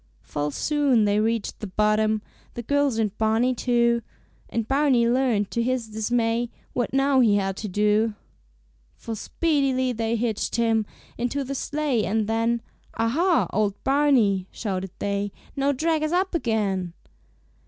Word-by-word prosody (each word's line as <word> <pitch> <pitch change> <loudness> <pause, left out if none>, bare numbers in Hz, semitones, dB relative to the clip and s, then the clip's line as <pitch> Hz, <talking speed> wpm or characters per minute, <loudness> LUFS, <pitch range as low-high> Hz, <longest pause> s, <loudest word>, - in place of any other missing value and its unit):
Full 145 0 -3
soon 275 - +2
they 205 0 +2
reached 225 0 -1
the 215 - -5
bottom, 215 +2 +1 0.3
The 240 - -5
girls 285 -1 +1
and 215 -3 0
Barney 225 +3 +2
too; 235 -1 +2 0.5
And 230 -1 -2
Barney 270 -4 +3
learned 235 -5 +1
to 235 - 0
his 250 -1 -1
dismay, 230 +2 0 0.2
What 245 - -1
now 270 0 +3
he 220 -5 +5
had 195 -1 0
to 215 - -4
do. 210 +2 +1 0.8
For 225 - -6
speedily 270 -1 0
they 225 0 -1
hitched 225 -2 -1
him 225 -2 +1 0.3
Into 245 +4 -1
the 270 +1 -4
sleigh, 280 -4 -1
and 215 +2 0
then 230 +1 0 0.3
"Aha! 260 - +2
old 205 -1 +1
Barney," 260 -10 +3
shouted 190 -3 -4
they, 200 0 -2 0.2
"Now 280 0 +1
drag 315 +3 0
us 310 0 -1
up 370 +2 +1
again." 205 - -1
230 Hz, 145 wpm, -24 LUFS, 215-265 Hz, 0.8 s, he